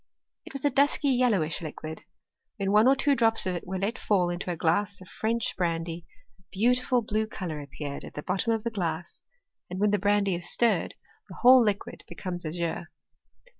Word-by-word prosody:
It - - -10
was 275 0 -4
a 290 - +3
dusky 280 +2 +2
yel 250 -2 +3
lowish 160 -5 -1
liquid. 155 0 -7 0.5
When 195 -1 -1
one 210 +3 +5
or 270 - +6
two 280 +1 +2
drops 225 -3 +2
of 185 - 0
it 175 - -6
were 190 +1 -3
let 200 +5 -2
fall 180 -4 +2
into 175 +1 -4
a 175 - -1
glass 200 +5 0
of 185 - -13
French 235 +3 -2
brandy, 165 -1 -2 0.3
a - - -25
beautiful 245 +3 +2
blue 215 0 -1
colour 175 -7 -5
appeared 140 0 -6
at - - -10
the 150 - -5
bottom 195 +5 +1
of 225 -1 0
the 235 - -2
glass, 170 -5 -4 0.5
and 180 +1 -5
when 210 0 +3
the 205 - +2
brandy 205 0 +2
is 175 0 -2
stirred, 235 -2 +1 0.3
the - - -9
whole 255 +1 +9
liquid 205 -2 -2
becomes 175 -3 -5
azure. 170 +1 -3
200 Hz, 200 wpm, -27 LUFS, 175-230 Hz, 0.5 s, whole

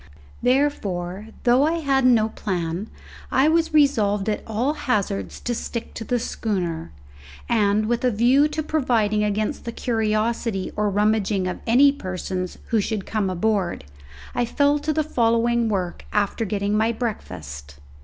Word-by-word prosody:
Therefore, 215 -8 0 0.2
though 245 +2 +4
I 310 +3 +3
had 275 -4 +1
no 225 -3 +4
plan, 180 -1 -3 0.4
I 265 +3 +4
was 325 +1 +2
resolved 220 -10 +3
at 210 - -1
all 235 +6 0
hazards 195 - -2
to 240 - -2
stick 235 0 -5
to 225 - -6
the 245 +2 0
schooner, 180 - -3 0.6
and, 215 -2 +2
with 240 +2 -1
a 250 - +4
view 245 +6 +4
to 305 +1 -3
providing 230 -9 +1
against 210 +1 -1
the 235 - -4
curiosity 220 -3 -1
or 210 0 +1
rummaging 205 -1 +1
of 180 - -4
any 270 +5 +6
persons 185 -6 -4
who 225 -2 +2
should 210 -1 -3
come 210 -3 -1
aboard 185 - 0 0.5
I 245 - +1
fell 285 +5 +2
to 305 +2 -1
the 310 +1 +1
following 235 -3 +2
work 185 -4 -2
after 210 +2 0
getting 200 0 -1
my 220 +2 +2
breakfast. 70 - -6
220 Hz, 150 wpm, -23 LUFS, 200-245 Hz, 0.6 s, any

